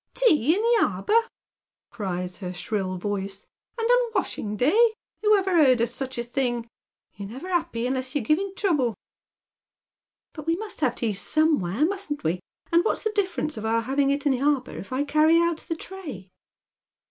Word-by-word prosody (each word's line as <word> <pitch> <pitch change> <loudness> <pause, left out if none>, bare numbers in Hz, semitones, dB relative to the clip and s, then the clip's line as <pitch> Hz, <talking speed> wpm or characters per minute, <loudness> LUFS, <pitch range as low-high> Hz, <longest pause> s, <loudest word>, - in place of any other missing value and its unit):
"Tea 320 - +4
in - - -1
the 470 0 +4
arbour 420 - -3
I 460 0 +4 0.3
" - - -68
cries 180 -3 -3
her 180 -3 -5
shrill 185 0 -3
voice, 195 +1 -4 0.2
" - - -50
and 455 - -1
on - - +5
a 485 -2 0
wash 385 - 0
ing 210 -1 -4
day! 440 - +4 0.3
Who 425 -1 +5
ever 375 -5 +3
heard 255 -3 +5
of 235 0 +1
such 260 +1 -6
a 235 - -1
thing? 240 -1 -2 0.5
You're 200 0 -8
never 265 +11 -8
happy 330 -10 -1
unless 260 +1 -2
you're 285 - +1
giving 355 - +1
trouble." 295 - +1 0.7
" - - -65
But 305 -1 -9
we 330 - +3
must 425 +3 -6
have 250 -4 +2
tea 225 -3 -1
somewhere, 285 - +2
musn't 380 -5 -3
we, 160 - +2
stupid? - - -31 0.3
And 340 - +6
what's - - -1
the 435 - 0
difference 370 - -1
of 215 - -5
our 230 +1 +2
having 275 +4 +1
it 280 +1 0
in 285 - +4
the 255 -1 0
arbour 280 -3 +1
if 195 - -8
I 260 +2 0
carry 310 +3 +4
o«t 340 -1 +1
the 330 - -2
tray 305 - -8
280 Hz, 205 wpm, -25 LUFS, 230-355 Hz, 0.7 s, And